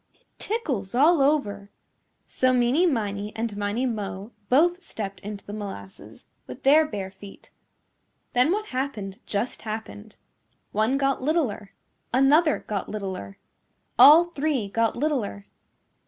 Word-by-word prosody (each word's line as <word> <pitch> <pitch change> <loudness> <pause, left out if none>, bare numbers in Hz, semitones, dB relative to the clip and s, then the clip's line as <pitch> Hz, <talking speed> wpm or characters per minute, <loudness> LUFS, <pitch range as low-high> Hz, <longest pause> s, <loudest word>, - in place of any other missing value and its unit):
"It - - -34 0.2
tickles 255 - -3
all 305 +4 +5
over." 205 -9 0 0.6
So 255 0 +1
Meeney 255 +8 +3
Miney 210 -5 -3
and 225 -2 -3
Miney 205 +5 -1
Mo 210 -3 -4 0.2
both 345 +7 +3
stepped 200 - -7
into 205 0 -8
the 205 - -8
molasses 195 - -9 0.2
with 125 - -10
their 305 +3 +5
bare 195 -6 -5
feet. 195 +1 -14 0.8
Then 250 +5 +3
what 425 +2 -2
happened 225 -7 -4
just 210 +4 -2
happened. 215 -1 -7 0.5
One 220 +6 +1
got 275 -1 0
littler. 260 - -1 0.4
Another 290 +5 +4
got 205 -3 -4
littler. 190 - -6 0.6
All 315 +4 +9
three 280 -9 -1
got 230 +2 0
littler. 250 -9 -2
230 Hz, 125 wpm, -25 LUFS, 205-280 Hz, 0.8 s, All